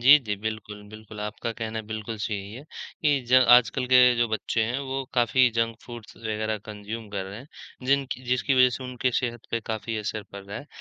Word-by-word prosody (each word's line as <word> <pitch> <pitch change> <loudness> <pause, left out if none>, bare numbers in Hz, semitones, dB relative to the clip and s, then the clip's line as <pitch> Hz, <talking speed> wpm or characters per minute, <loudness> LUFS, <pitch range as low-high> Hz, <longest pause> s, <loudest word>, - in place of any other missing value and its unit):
जी, 135 +5 +9
जी, 110 -7 -3
बिल्कुल, 105 0 -5
बिल्कुल 110 0 -10
आपका 105 +2 -4
कहना 110 -1 -4
बिल्कुल 110 +1 -5
सही 100 -2 -3
है 130 - -9 0.4
कि 145 -3 +3
ज - - -3 0.2
आजकल 125 +1 +5
के 130 - +8 0.2
जो 120 0 +3
बच्चे 110 +1 0
हैं 125 +4 -1
वो 135 +1 -2
काफ़ी 125 +1 +4
जंक 115 -1 0
फूड्स 120 -3 -10
वगैरह 110 -1 -2
कंज्यूम 105 +1 -7
कर 100 -2 -3
रहे 100 +2 -8
हैं, 130 - -12 0.4
जिनकी 135 -2 +1
जिसकी 125 +2 +1
वजह 125 0 +6
से 130 - -8
उनकी 125 0 -1
सेहत 120 -2 -1
पे 115 - 0
काफ़ी 110 0 -3
असर 105 0 -3
पड़ 100 0 -8
रहा 100 +2 -7
है। 145 - -11
115 Hz, 205 wpm, -26 LUFS, 110-125 Hz, 0.4 s, जी